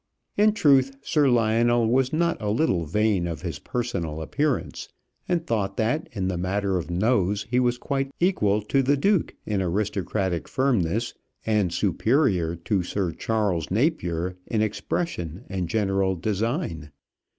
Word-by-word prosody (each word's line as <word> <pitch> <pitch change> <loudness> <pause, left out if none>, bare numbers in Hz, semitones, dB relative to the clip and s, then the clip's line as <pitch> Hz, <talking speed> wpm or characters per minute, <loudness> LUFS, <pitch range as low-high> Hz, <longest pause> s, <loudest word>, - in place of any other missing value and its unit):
In 210 +1 +4
truth, 135 -8 +3
Sir 145 -3 +2
Lionel 115 0 +3
was 130 +2 +2
not 170 -1 0
a 105 - -1
little 105 - +1
vain 105 0 +1
of 85 +1 -5
his 85 -5 -4
personal 85 -11 -3
appearance, 145 - -2 0.4
and 170 -2 0
thought 100 -4 -1
that 120 +8 0
in 95 -4 -2
the 90 -2 -2
matter 95 +1 0
of 85 - -6
nose, 100 +1 +1
he 125 - +3
was 125 -1 +1
quite 135 +1 -2
equal 105 - +2
to 135 +6 +2
the 140 +2 +2
Duke 195 +4 +1
in 105 -3 -1
aristocratic 95 -1 -1
firmness, 120 -5 0 0.3
and 105 -5 +1
superior 95 - +1
to 95 +4 -1
Sir 90 0 -2
Charles 100 -5 -1
Napier 90 - 0
in 110 -1 +1
expression 100 - -3
and 95 -3 -3
general 95 -2 +1
design. 105 - -2
105 Hz, 145 wpm, -25 LUFS, 90-130 Hz, 0.4 s, In